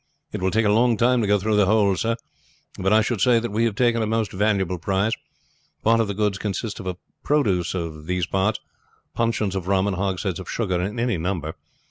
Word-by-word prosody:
"It - - -5
will 95 - +2
take 110 +3 +1
a 105 - +4
long 115 +1 +3
time 125 +1 +3
to 105 - 0
go 105 0 +4
through 105 +2 0
the 100 -2 +4
whole 100 -2 +3
sir, 115 +4 0 0.6
but 95 +1 +1
I 110 +1 +6
should 110 -2 -1
say 125 +1 +5
that 115 -1 -4
we 110 +3 +1
have 110 -3 -1
taken 120 0 +2
a 110 - 0
most 110 -2 0
valuable 95 -3 0
prize. 100 +5 0 0.7
Part 115 +1 +4
of 115 - +2
the 100 - -3
goods 105 -1 0
consist 105 +1 -3
of 90 -2 -4 0.3
produce 100 - +1
of 80 -3 -5
these 90 -1 0
parts 95 +4 0 0.5
puncheons 115 -4 0
of 95 -2 -3
rum 95 0 +2
and 100 -2 -1
hogsheads 95 -1 -2
of 95 - -8
sugar 95 -6 -1
in 105 +6 -3
any 120 -7 0
number. 80 -3 -2
100 Hz, 220 wpm, -23 LUFS, 95-115 Hz, 0.7 s, I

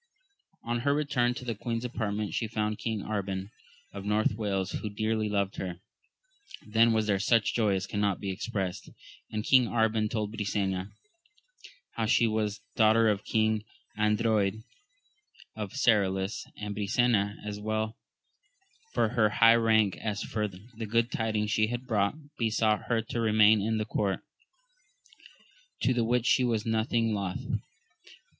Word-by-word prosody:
On 120 +1 -1
her 140 +4 +1
return 125 -5 +1
to 125 - -7
the 120 - -1
queen's 115 +2 -3
apartment, 105 -4 -3
she 115 - -1
found 105 -1 -2
King 110 -3 -2
Arban, 95 -1 -3 0.4
of 100 - -6
North 105 +1 +1
Wales, 100 -3 -2
who 105 - -4
dearly 110 +1 -1
loved 100 -1 -1
her. 90 -2 -4 0.9
Then 115 +2 +4
was 110 -1 +2
there 100 -2 +1
such 115 +2 +2
joy 105 -4 +2
as 95 0 -2
cannot 100 -2 -1
be 100 -2 -3
expressed; 95 -2 -4 0.4
and 105 -1 -3
King 130 +1 +5
Arban 110 -2 +1
told 105 -2 -2
Brisena 100 -3 -2 1.0
how 110 -1 -2
she 115 - +4
was 105 -2 -1
daughter 110 -1 +4
to 100 - -12
King 110 -1 +1 0.3
Ardroyd 105 -1 +1 0.9
of 105 -3 -5
Serolys; 100 -6 +1
and 105 0 -4
Brisena, 105 -1 +1
as 105 0 -5
well 110 +1 -2 1.0
for - - +2
her 110 -2 +3
high 115 +2 +6
rank 110 -4 +3
as 105 -2 -3
for 105 -1 -2
the 110 +4 -9
good 115 +3 +1
tidings 110 -1 -1
she 110 +1 +2
had 120 +2 -4
brought, 105 -3 +1 0.2
besought 110 -2 +1
her 115 -2 0
to 115 +1 -3
re 110 -1 +1
main 105 0 +6
in 110 +2 0
her 110 - -1
court; 100 -3 -1 1.6
to 130 - +3
the 120 -1 +1
which 120 +1 +1
she 130 - +4
was 115 -3 0
nothing 115 0 +1
loth. 100 -3 -3
110 Hz, 150 wpm, -29 LUFS, 105-115 Hz, 1.6 s, high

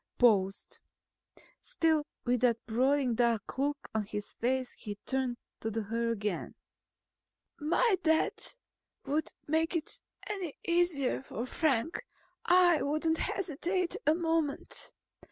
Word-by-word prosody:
Paused. 200 -5 +2 0.8
Still 320 -10 +1 0.2
with 245 -1 +1
that 240 -2 +4
brooding 255 +3 +2
dark 235 0 0
look 285 +1 -1
on 220 -1 +1
his 210 -1 -5
face 255 +1 -1
he 210 -2 -7
turned 260 -2 0 0.2
to 220 - -2
her 225 +2 -1
again. 210 -5 -2 1.0
"If - - -29
my 390 +5 +3
death 320 +8 +2 0.5
would 295 +3 0
make 320 +3 +1
it 325 - 0 0.3
any 380 -7 -4
easier 340 -7 +2
for 245 -2 -5
Frank, 285 +1 0 0.4
I 350 -2 +5
wouldn't 315 +3 +1
hesitate 360 0 0
a 305 - +6
moment. 325 -4 -1
280 Hz, 120 wpm, -31 LUFS, 235-325 Hz, 1.0 s, a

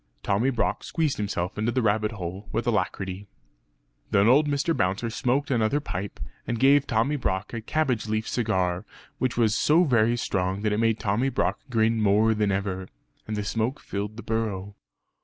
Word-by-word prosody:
Tommy 105 +7 +2
Brock 120 -4 -1
squeezed 160 -4 -1
himself 100 -2 -3
into 110 +3 +1
the 130 0 0
rabbit 105 +1 +1
hole 95 +1 -6
with 115 +1 -1
alacrity. 100 -3 -2 0.8
Then 100 +2 +4
old 145 +5 +5
Mr. 145 +3 0
Bouncer 95 +6 0
smoked 140 +3 0
another 120 +3 +2
pipe, 100 -8 -5 0.3
and 115 -1 -2
gave 140 +2 +5
Tommy 120 +6 +1
Brock 95 -5 -2
a 115 - -3
cabbage 125 -3 0
leaf 110 0 -1
cigar 95 -6 0 0.4
which 130 -2 -1
was 110 -2 +3
so 160 +4 +4
very 120 -5 +3
strong 95 -2 -1
that 105 -1 +1
it 105 - 0
made 115 -1 +2
Tommy 105 +7 +1
Brock - - 0
grin 115 -1 +2
more 105 +2 +4
than 105 -2 +1
ever; 95 -1 -2 0.4
and 105 -1 -3
the 105 - -1
smoke 115 +6 -1
filled 105 +2 -5
the 115 - -7
burrow. 105 -3 -3
110 Hz, 175 wpm, -26 LUFS, 100-125 Hz, 0.8 s, old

